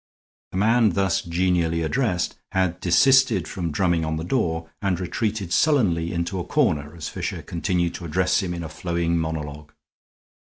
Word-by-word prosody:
The - - -4
man 110 0 +3
thus 95 -2 +1
genially 85 -1 0
addressed 100 - 0 0.2
had 90 -2 0
desisted 120 0 +4
from 90 -3 -3
drumming 85 +1 +1
on 80 0 -1
the 80 - -4
door 85 -6 -1
and 95 -3 0
retreated 100 0 -2
sullenly 90 - +2
into 85 +2 -2
a - - -2
corner 75 0 0
as 80 -3 -6
Fisher - - -4
continued 85 0 -1
to 85 - -7
address 90 +5 +1
him 90 -2 -3
in 85 - -5
a 80 - -6
flowing 85 +1 -1
monologue. 75 -2 -5
85 Hz, 160 wpm, -23 LUFS, 85-95 Hz, 0.2 s, desisted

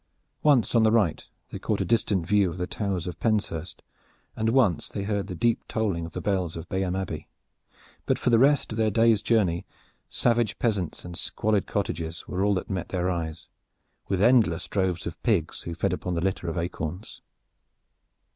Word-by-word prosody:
Once 140 -7 +4
on 115 - +5
the 110 0 +4
right 110 -8 +1 0.2
they - - -5
caught - - -1
a - - 0
distant 105 -6 +1
view 100 0 +3
of 85 - -7
the 90 - -1
Towers 95 -2 -2
of 90 -2 -6
Penshurst, 100 -7 -1 0.5
and 110 0 0
once 115 - +2
they 100 - -4
heard 100 -1 -1
the 90 - -5
deep 115 +6 +1
tolling 95 -7 -1
of 85 - -13
the - - -4
bells 95 -5 -1
of 85 +1 -7
Bayham 95 -1 -1
Abbey, 85 -5 -4 0.8
but - - +2
for 125 - 0
the 115 - +5
rest 140 0 +4
of 110 - -4
their 110 -1 +3
day's 115 0 +4
journey 95 -7 +2 0.5
savage 120 -3 +1
peasants 100 -10 -1
and 90 0 -7
squalid 105 +3 0
cottages 85 -5 -3
were 95 +1 -1
all 100 0 +3
that 95 - -3
met 95 -3 -3
their 90 0 0
eyes, 80 -2 -4 0.6
with 95 0 +1
endless 115 -8 +4
droves 95 -3 -1
of 85 -1 -6
pigs 95 -9 0
who 85 - -6
fed - - 0
upon 90 -1 -3
the 85 - -1
litter 95 -1 -1
of 80 - -4
acorns. 85 +2 -4
95 Hz, 190 wpm, -26 LUFS, 85-110 Hz, 0.8 s, on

